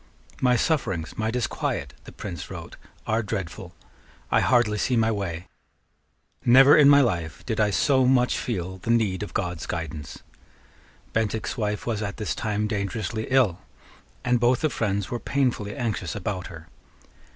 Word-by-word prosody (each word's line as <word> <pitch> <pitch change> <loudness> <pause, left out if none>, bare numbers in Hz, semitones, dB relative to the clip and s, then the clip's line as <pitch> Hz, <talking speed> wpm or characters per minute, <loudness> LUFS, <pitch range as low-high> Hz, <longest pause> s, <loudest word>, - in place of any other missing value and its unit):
"My 125 -1 +4
sufferings, 105 - -1
my 110 0 -1
disquiet," 125 +1 -2
the - - -10
Prince 85 -4 -7
wrote, - - -8 0.3
"are 110 +1 +1
dreadful. 100 -6 -5 0.6
I - - +5
hardly 115 -4 +3
see 125 +3 +1
my 110 0 +3
way. 90 -5 -3 1.0
Never 135 +4 +8
in 145 -2 +7
my 145 0 +7
life 85 - -2
did 110 -3 -2
I 105 -1 +3
so 130 +5 +3
much 125 -1 +3
feel 95 -5 -4
the 100 - -7
need 110 -5 +2
of 105 - -6
God's 90 -3 -2
guidance." 80 -4 -5 0.9
Bentinck's 110 0 -1
wife 105 -3 -2
was 110 -3 -2
at 100 -1 -4
this 105 - -2
time 105 -1 -1
dangerously 110 +1 -3
ill; 125 -10 +3 0.7
and 125 -1 +3
both 120 +1 +3
the 155 -2 +1
friends 100 -3 -1
were 120 - -2
painfully 120 -8 -1
anxious 110 - -3
about 95 -2 -3
her. 80 -2 -11
110 Hz, 155 wpm, -25 LUFS, 95-125 Hz, 1.0 s, Never